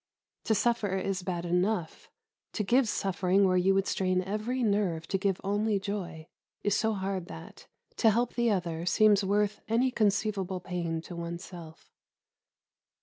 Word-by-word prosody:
To 220 - +2
suffer 210 -4 +1
is 190 0 -2
bad 175 -1 -3
enough; 180 0 -1 0.4
to 210 - -1
give 240 +3 +3
suffering 195 0 +1
where 185 - +2
you 190 +2 +3
would 195 0 +2
strain 185 -2 0
every 215 +6 -2
nerve 200 -7 0
to 195 - +1
give 195 -1 0
only 205 +2 +1
joy 190 -5 -5 0.4
is 205 -1 +2
so 220 0 +1
hard 190 -2 -3
that, 80 - -11 0.3
to 225 - +5
help 235 +3 +1
the 240 -1 +1
other, 170 -4 -1
seems 210 0 +4
worth 205 +1 0
any 240 +4 +2
conceivable 205 -4 0
pain 175 -3 -3
to 175 - -9
oneself. 170 -1 -8
195 Hz, 150 wpm, -29 LUFS, 180-210 Hz, 0.4 s, to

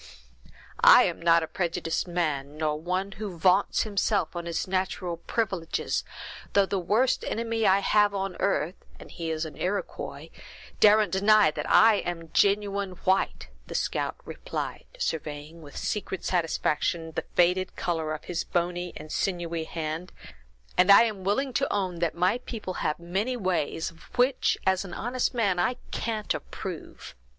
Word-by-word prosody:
"I - - +9
am - - -2
not 170 0 +4
a - - -4
prejudiced 170 -1 -2
man, 150 -5 -2
nor 155 -1 0
one 185 +3 -2
who 195 -3 -6
vaunts 185 +4 +3
himself 200 -4 0
on 170 0 -4
his 170 +2 -2
natural 185 -2 -2
privileges, 190 -7 -2 0.5
though 200 -1 +5
the 195 0 -1
worst 225 +9 +1
enemy 225 -1 -1
I 195 +1 +4
have 205 0 +3
on 195 -2 -2
earth, 175 -2 -1 0.2
and - - -12
he 165 -2 -5
is 160 0 -2
an 155 - -8
Iroquois, 190 0 -4 0.5
daren't 210 -2 +5
deny 205 -1 +5
that 150 -1 -5
I 220 -1 +6
am 165 -3 -5
genuine 200 -1 +2
white," 190 +1 +1 0.2
the - - -7
scout - - -1
replied, - - -5
surveying, 155 - -4
with 145 -2 -11
secret 200 -3 -3
satisfaction, 165 -1 0
the - - -4
faded 180 +1 +2
color 160 -3 -2
of 150 - -10
his 175 -1 -3
bony 175 0 -2
and 155 0 -10
sinewy 170 -3 -2
hand, 160 +2 -4 0.7
"and 180 +2 +5
I 200 - +9
am 210 -5 -3
willing 250 +8 0
to 275 +3 0
own 185 -4 -1
that 170 -2 0
my 185 +7 +2
people 220 -6 -6
have 150 - 0
many 195 +9 -2
ways, 175 -6 -1
of 165 -1 -20 0.2
which, 250 +2 +3
as 190 0 +2
an 185 -3 -8
honest 250 +2 -1
man, 200 -6 +1
I 245 +8 +1 0.2
can't 220 -2 -2
approve. - - -7
185 Hz, 160 wpm, -27 LUFS, 165-205 Hz, 0.7 s, I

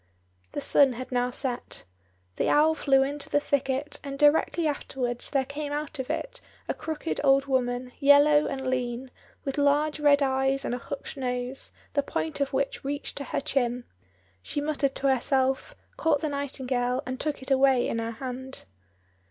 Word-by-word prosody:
The - - -3
sun 275 -3 +5
had 255 +2 -7
now 245 0 +1
set. 250 -1 -4 0.5
The - - +1
owl 310 +2 +5
flew 270 -4 +3
into 285 +2 -3
the 290 - +3
thicket, 280 0 -1
and 275 -1 -5
directly 300 +3 +3
afterwards 255 -5 -2
there 275 -2 +1
came 290 +2 -5
out 295 0 -4
of 260 - -4
it - - -3 0.3
a - - 0
crooked 320 +1 -3
old 275 0 +5
woman, 250 -2 -1
yellow 290 +1 +6
and 265 -1 -4
lean, 250 0 -2 0.3
with 275 +1 -2
large 295 +2 +2
red 290 -1 +5
eyes 270 0 +1
and - - -1
a 245 - -2
hooked 280 +3 -7
nose, 250 0 -3 0.2
the 285 - +3
point 160 - -3
of 280 - 0
which 275 0 -1
reached 285 +1 -4
to 280 - -4
her - - -2
chin. 250 -4 0 0.6
She 290 - -3
muttered 290 -2 0
to 275 - 0
herself, 265 +1 0 0.2
caught 305 -3 +2
the 310 - -1
nightingale, 260 -3 -1
and 255 0 -4
took 295 -3 -3
it 265 - -6
away 265 -2 +4
in 230 - -1
her 230 0 -3
hand. 260 +2 -7
270 Hz, 175 wpm, -27 LUFS, 255-285 Hz, 0.6 s, yellow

